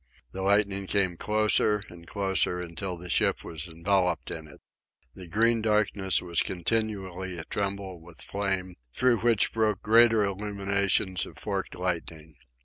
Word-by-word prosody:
The 95 - -5
lightning 100 0 +2
came 95 -3 +1
closer 105 +1 +2
and 85 -1 -13
closer, 95 -3 0
until 90 +1 -5
the 90 +1 -8
ship - - +1
was 80 0 -6
enveloped 90 +2 0
in 80 -2 -7
it. 75 - -15 0.5
The 90 -2 -10
green 115 +5 +2
darkness 105 -4 +1
was 85 -2 +1
continually 95 -2 -2
a 80 - -4
tremble 100 -1 -4
with 85 0 -14
flame, 95 -2 -2 0.2
through 125 -3 +3
which 115 -2 +2
broke 110 -3 0
greater 115 0 +5
illuminations 100 -2 0
of - - -13
forked - - -3
lightning. 80 -3 -4
95 Hz, 140 wpm, -27 LUFS, 90-105 Hz, 0.5 s, greater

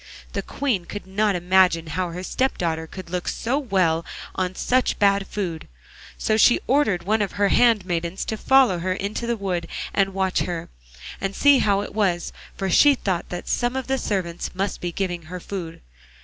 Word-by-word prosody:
The - - -1
Queen 235 -11 -2
could 205 +3 -7
not 200 +1 +1
imagine 180 -1 +3
how 175 +3 -2
her 180 +2 -6
step 260 +7 0
daughter 160 -2 -2
could 185 0 -10
look 180 -1 -3
so 255 +5 -1
well 185 - +1 0.3
on 185 0 -2
such 255 +5 +1
bad 200 -1 +3
food, 175 -6 -4 0.5
so 215 - +1
she 240 +2 +5
ordered 230 -11 +2
one 215 +4 +1
of 200 - -2
her 200 -1 +2
handmaidens 185 -7 +2
to 220 - -2
follow 255 -5 +4
her 185 +2 -1
into 200 +5 -3
the 235 -1 0
wood 180 -4 -2 0.3
and 195 -1 +1
watch 190 -1 +1
her, 175 -2 -3 0.5
and 195 0 -2
see 285 -2 +5
how 200 -3 +2
it - - -7
was, 185 -5 0 0.2
for 195 - -2
she 285 - +6
thought 185 -8 -2
that 175 0 -6
some 245 +1 0
of 265 -1 -2
the 270 0 -1
servants 180 -7 -3
must 195 +1 -2
be 175 - -2
giving 175 -1 -2
her 180 +3 -7
food. 175 -3 -6
190 Hz, 190 wpm, -23 LUFS, 175-215 Hz, 0.5 s, she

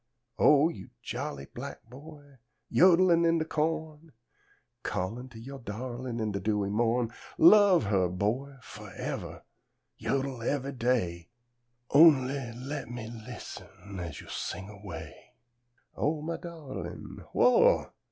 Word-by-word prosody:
O 150 +2 +6
you 95 - -9
jolly 70 -1 -4
black - - -7
boy, 145 +1 -13 0.3
Yod'lin' 175 -1 +5
in 165 0 +4
de 160 - 0
co'n, 160 0 -2 0.7
Callin' 115 +8 -3
to 120 - -13
yo' 135 +4 -8
dawlin', 120 +2 -5
In 110 -1 -1
de 100 - -2
dewy 100 0 0
mo'n, 115 +2 +1 0.3
Love 190 - +7
'er, 95 -2 +3
boy, 115 +10 -2
forevah, - - -7 0.5
Yodel 135 -3 -2
ever' 140 +3 -1
day; 115 -10 -1 0.6
Only 140 -5 +5
le' 135 +4 -6
me 115 -2 -7
lis'n, 100 -4 -9
As 85 -4 -6
yo' - - -12
sing 95 +3 -5
away: 100 -3 -10 0.6
"O 150 0 -1
mah 165 +1 -3
dawlin'! 160 -6 -8
Who - - 0
ah! 485 - +5
130 Hz, 125 wpm, -29 LUFS, 110-150 Hz, 0.7 s, Love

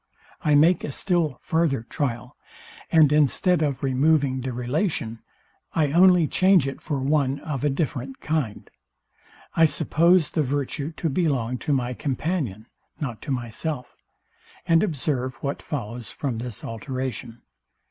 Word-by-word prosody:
I 150 -1 +3
make 165 +4 +4
a - - -3
still 165 -3 0
farther 155 -4 0
trial; 125 -1 -3 0.6
and 155 -3 +6
instead 155 +4 +3
of 140 -4 -1
removing 135 0 +2
the 130 +1 -3
relation, 125 - -2 0.6
I 150 -3 +2
only 180 0 +6
change 185 -5 +4
it 135 - -6
for 145 - -2
one 135 0 +1
of 145 -4 -4
a 145 - +3
different 135 -2 -3
kind. 150 -9 -2 0.9
I 165 - +6
suppose 170 +2 +3
the 155 - +1
virtue 145 +2 -2
to 165 - -3
belong 135 -6 0
to 150 - -2
my 125 -2 0
companion, 135 - -2 0.3
not 125 -7 -4
to - - -5
myself; 125 +2 -4 0.7
and 165 -1 +4
observe 140 -8 -1
what 140 0 -2
follows 120 -4 -5
from 130 -6 -3
this 120 -3 -6
alteration. 125 0 -5
140 Hz, 135 wpm, -24 LUFS, 125-160 Hz, 0.9 s, and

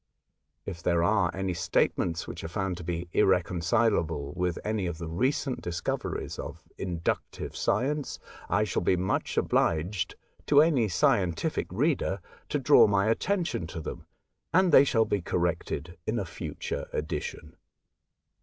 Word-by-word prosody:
If 90 -4 -6
there 85 0 +2
are 100 -2 +3
any 95 -1 -2
statements 85 0 0
which - - -7
are - - -3
found 95 +1 -2
to 90 - -8
be 85 +1 -3
irrecon 90 -1 +2
cilable 85 -8 +1
with 90 -1 -1
any 105 -3 -1
of 85 -2 -4
the 85 0 -5
recent 130 - 0
discoveries 85 -1 -3
of - - -8
inductive 85 -2 -3
science, 140 +6 0 0.3
I 100 +4 +3
shall 105 - -1
be 90 - +3
much 90 +2 -1
obliged 85 +5 +1 0.3
to 145 - +6
any 145 -8 +3
scientific 95 - +1
reader 125 - +1 0.3
to - - +1
draw - - +6
my 100 +1 +2
attention 175 - -1
to 80 - -6
them, 80 - -7 0.4
and 185 +1 +4
they 140 -1 +8
shall 115 -4 +3
be 105 -2 0
corrected 85 -1 -2
in - - 0
a - - -1
future - - -5
edition. - - -4
95 Hz, 145 wpm, -28 LUFS, 85-110 Hz, 0.4 s, they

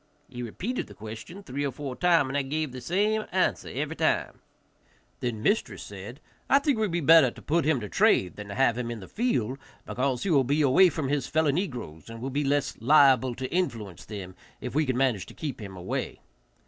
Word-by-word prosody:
He 125 -2 -8
repeated 185 - -4
the - - -13
question 115 - -9
three 140 -2 -4
or 140 - -1
four 135 0 -6
times, 165 -2 +3
and 135 - -4
I - - +2
gave 150 +1 -2
the 130 0 -8
same 210 - +1
answer 185 0 +1
every - - -3
time. - - 0 0.8
Then 115 -3 -3
mistress 215 - 0
said, - - -9 0.3
"I 275 - +6
think 280 -3 +1
it - - -3
would 215 -2 +1
be 170 0 0
better 160 -2 +7
to - - -13
put 165 0 0
him 155 -4 +2
to 105 - -5
trade 90 -1 +3
than 105 -1 -8
to 100 - -6
have 120 0 +2
him 120 -1 -3
in 120 -1 -5
the 95 - -10
field, 135 - -1 0.3
because 130 -1 -1
he 195 - 0
will 140 -4 +5
be 145 +4 +1
away 145 +7 +6
from 155 -4 -3
his 140 -2 0
fellow 155 -2 +2
negroes, 125 - -4
and 115 0 -8
will 135 +3 -4
be 145 +3 0
less 145 0 0
liable 130 -1 +5
to 130 +1 -5
influence 115 - -2
them 95 -4 -7 0.3
if 125 - -6
we 150 +1 +1
can 130 -1 0
manage 125 -7 +1
to - - -13
keep 145 -7 -5
him 100 -2 -8
away." 90 +1 -4
135 Hz, 225 wpm, -27 LUFS, 120-160 Hz, 0.8 s, better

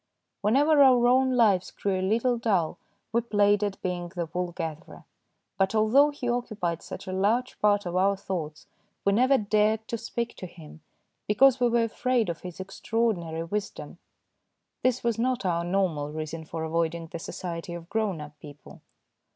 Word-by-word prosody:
Whenever 285 +8 +4
our 255 -3 +6
own 260 +1 +3
lives 200 -6 +3
grew 195 -2 -2
a - - -2
little 230 +6 +1
dull 200 -9 0 0.3
we 235 - +3
played 205 -2 +2
at 200 -2 -2
being 175 -1 -3
the 175 -1 -4
wool 180 0 -2
gatherer, 165 -2 -7 0.5
but 195 +2 +2
although 235 +7 +5
he 285 -4 -6
occupied 215 -9 -2
such - - -8
a 185 - -5
large 220 +7 0
part 205 -1 +3
of 175 0 -4
our 195 +2 +2
thoughts 170 -6 -5 0.4
we 200 - +3
never 260 +5 +4
dared 215 0 +1
to 230 - -3
speak 235 +1 -4
to 185 - -7
him, 160 -2 -14 0.5
because 255 +5 +5
we 245 -1 +3
were 235 0 +2
afraid 235 -1 0
of 165 - -5
his 180 -1 -9
extra 195 +4 -6
ordinary 170 -8 0
wisdom. 205 +5 -5 0.8
This 255 -1 +1
was 235 -2 0
not 250 -2 0
our 170 -2 0
normal 175 -5 -1
reason 155 +1 -5
for 160 +1 -5
avoiding 165 +1 -1
the 165 +1 -8
society 170 0 -6
of 170 -1 -9
grown 205 -4 -1
up 150 0 -11
people. 145 -2 -13
200 Hz, 175 wpm, -27 LUFS, 170-235 Hz, 0.8 s, our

